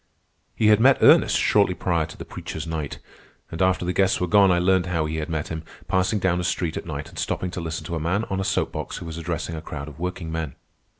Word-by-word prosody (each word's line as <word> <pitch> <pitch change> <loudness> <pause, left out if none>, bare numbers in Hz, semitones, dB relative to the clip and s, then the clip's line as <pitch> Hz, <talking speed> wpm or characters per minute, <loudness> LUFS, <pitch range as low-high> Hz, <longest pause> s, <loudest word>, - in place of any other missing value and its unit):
He 110 - +3
had 105 0 +6
met 130 +3 +6
Ernest - - +6
shortly - - +3
prior 85 -3 0
to - - -12
the - - -8
"preacher's 80 0 -6
night." 80 -3 -4 0.5
And 80 - -4
after 95 -1 +2
the 90 - -1
guests 95 0 +2
were 90 - +1
gone, 100 +2 +5
I 90 - +4
learned 90 0 +2
how 85 -3 0
he 80 +1 -3
had 80 +1 -3
met 80 -2 -3
him, 80 -1 -4 0.3
passing 95 +4 +1
down 90 -3 +1
a - - -2
street 85 -2 -1
at - - -5
night 75 +1 -5
and 85 - -9
stopping 90 - -2
to 90 - -5
listen 80 -1 -4
to 85 - -3
a - - -2
man 90 +7 0
on 95 -3 -3
a - - 0
soap 95 - 0
box - - -5
who - - -7
was 80 0 -6
addressing 85 0 -3
a 80 - -5
crowd 75 -2 -7
of 75 0 -11
workingmen. 80 -4 -4
85 Hz, 255 wpm, -24 LUFS, 80-95 Hz, 0.5 s, had